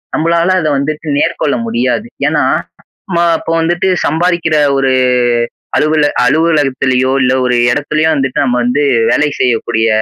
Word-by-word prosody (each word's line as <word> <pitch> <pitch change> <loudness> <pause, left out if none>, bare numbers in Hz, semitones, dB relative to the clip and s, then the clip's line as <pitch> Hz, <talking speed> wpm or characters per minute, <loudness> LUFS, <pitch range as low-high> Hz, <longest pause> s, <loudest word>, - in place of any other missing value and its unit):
நம்மளால 170 +3 +1
அத 155 - -1
வந்துட்டு 155 +3 -4
மேற்கொள்ள 145 - 0
முடியாது. 125 - -1 0.2
ஏன்னா - - +1 0.6
நம்ம 175 -3 -1 0.2
அப்ப - - -9
வந்துட்டு 175 +3 0 0.2
சம்பாரிக்கிற 170 -1 0 0.2
ஒரு 135 -1 +1 0.8
அலுவல 155 0 +2 0.2
அலுவலகத்திலயோ 135 -3 +1
இல்ல 130 0 +2
ஒரு 125 -1 +1 0.2
இடத்துலையோ 155 +2 0
வந்துட்டு 135 -2 -2
நம்ம 125 -2 0
வந்து 125 +4 0 0.3
வேலை 150 0 +1
செய்யக்கூடிய 115 -2 0
150 Hz, 125 wpm, -13 LUFS, 130-165 Hz, 0.8 s, அலுவல